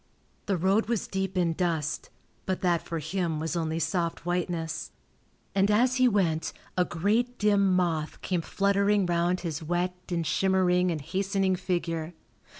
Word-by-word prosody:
The 195 -3 +1
road 195 +6 +2
was 230 -3 -1
deep 190 -1 -2
in 170 -2 +2
dust, 160 -4 -1 0.4
but 185 -1 -1
that 175 -3 +2
for 170 -1 -4
him 160 0 -2
was 160 +2 -2
only 160 -1 -1
soft 170 -1 -1
whiteness, 175 -2 -2 0.6
and 195 +1 +3
as 245 +5 +3
he 255 0 +5
went 175 -8 +1 0.2
a 180 - +3
great 215 +9 0
dim 200 -2 +3
moth 165 -4 0
came 180 -2 0
fluttering 200 +2 +2
round 175 +1 +1
his 165 -3 -3
wet 175 +3 -1 0.2
and 170 -2 -1
shimmering 185 0 +2
and 160 -3 -2
hastening 190 +4 0
figure. 175 -3 -2
180 Hz, 150 wpm, -28 LUFS, 165-195 Hz, 0.6 s, he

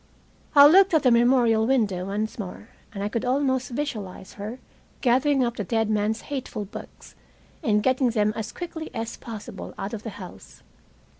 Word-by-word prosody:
I 285 0 +10
looked 375 +4 +6
at 310 - +3
the 255 - +5
memorial 235 -2 +4
window 210 -9 +1
once 215 +3 -3
more, 205 +2 -7 0.2
and 200 -1 -5
I - - 0
could 230 +2 -2
almost 260 0 +1
visualize 220 -9 -5
her 210 +4 -6 0.4
gathering 265 +2 +3
up 240 -1 -2
the 210 - -2
dead 225 +2 0
man's 215 +1 0
hateful 260 -7 -5
books, 195 - -11 0.5
and 210 -2 +2
getting 260 -1 +3
them 215 -2 +1
as 220 -1 -4
quickly 330 -2 -6
as 225 0 -4
possible 210 -4 -8
out 195 +3 -5
of 220 - -4
the 225 - -6
house. 180 - -12
230 Hz, 170 wpm, -25 LUFS, 210-260 Hz, 0.5 s, I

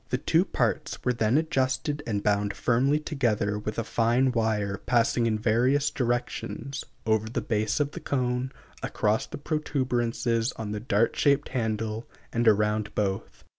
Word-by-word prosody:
The 125 - +1
two 165 +7 +2
parts 120 - -1
were 125 - +3
then 115 +2 +2
adjusted 145 -2 0
and 105 -3 -1
bound 100 -1 +1
firmly 135 +5 +2
together 110 -9 0
with 105 +1 -5
a 115 - 0
fine 120 +4 +2
wire 110 -4 0
passing 120 -1 +3
in 110 -1 +1
various 125 +6 +2
directions, 120 +2 -2 0.2
over 110 -1 +1
the 115 - -1
base 110 +1 0
of 145 -1 +1
the - - -7
cone, 125 -1 -1 0.3
across 105 +1 0
the - - -7
protuberances 125 -6 0
on 105 -2 -5
the 105 - -3
dart 110 0 +1
shaped 140 0 +2
handle, 110 -2 -2 0.2
and 115 0 +1
around 105 0 +2
both. 100 -2 -2
115 Hz, 155 wpm, -27 LUFS, 110-130 Hz, 0.3 s, were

